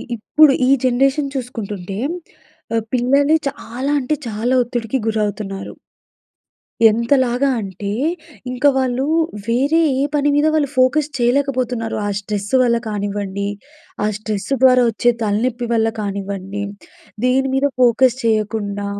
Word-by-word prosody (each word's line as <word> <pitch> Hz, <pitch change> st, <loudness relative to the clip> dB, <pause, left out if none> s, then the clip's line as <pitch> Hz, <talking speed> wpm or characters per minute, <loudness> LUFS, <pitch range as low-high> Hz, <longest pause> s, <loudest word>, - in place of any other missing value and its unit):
ఇప్పుడు 280 Hz, +6 st, +4 dB
ఈ -, -, +3 dB, 0.2 s
జనరేషన్ 275 Hz, +3 st, +1 dB
చూసుకుంటుంటే 205 Hz, -7 st, -5 dB, 0.8 s
ఆహ్, 225 Hz, -, 0 dB
పిల్లలే 280 Hz, +5 st, +3 dB
చాలా 270 Hz, 0 st, -5 dB
అంటే 265 Hz, +4 st, -1 dB
చాలా 225 Hz, +4 st, -1 dB
ఒత్తిడికి 240 Hz, 0 st, -3 dB
గురవుతున్నారు. 210 Hz, -2 st, -3 dB, 1.2 s
ఎంతలాగా 245 Hz, +3 st, +1 dB
అంటే, 200 Hz, 0 st, -5 dB, 0.6 s
ఇంక 250 Hz, +2 st, -6 dB
వాళ్ళు 260 Hz, 0 st, 0 dB, 0.4 s
వేరే 280 Hz, +8 st, +2 dB, 0.2 s
ఏ -, -, +1 dB
పని 290 Hz, 0 st, +2 dB
మీద 295 Hz, +1 st, +3 dB
వాళ్ళు 300 Hz, -3 st, +2 dB
ఫోకస్ 265 Hz, +4 st, +3 dB
చేయలేకపోతున్నారు. 250 Hz, -2 st, 0 dB
ఆ -, -, -1 dB
స్ట్రెస్ 205 Hz, 0 st, -4 dB
వల్ల 235 Hz, -1 st, +3 dB
కానివ్వండి, 200 Hz, -1 st, -3 dB, 0.6 s
ఆ -, -, +2 dB
స్ట్రెస్ 215 Hz, -2 st, -4 dB
ద్వారా 255 Hz, -1 st, +6 dB
వచ్చే 240 Hz, +2 st, +2 dB
తలనొప్పి 235 Hz, +3 st, -1 dB
వల్ల 225 Hz, -1 st, +2 dB
కానివ్వండి. 200 Hz, 0 st, -4 dB, 0.6 s
దేని 265 Hz, +1 st, +2 dB
మీద 270 Hz, +1 st, +2 dB, 0.2 s
ఫోకస్ 245 Hz, +1 st, +4 dB
చేయకుండా, 210 Hz, -2 st, -1 dB
240 Hz, 115 wpm, -19 LUFS, 210-265 Hz, 1.2 s, ద్వారా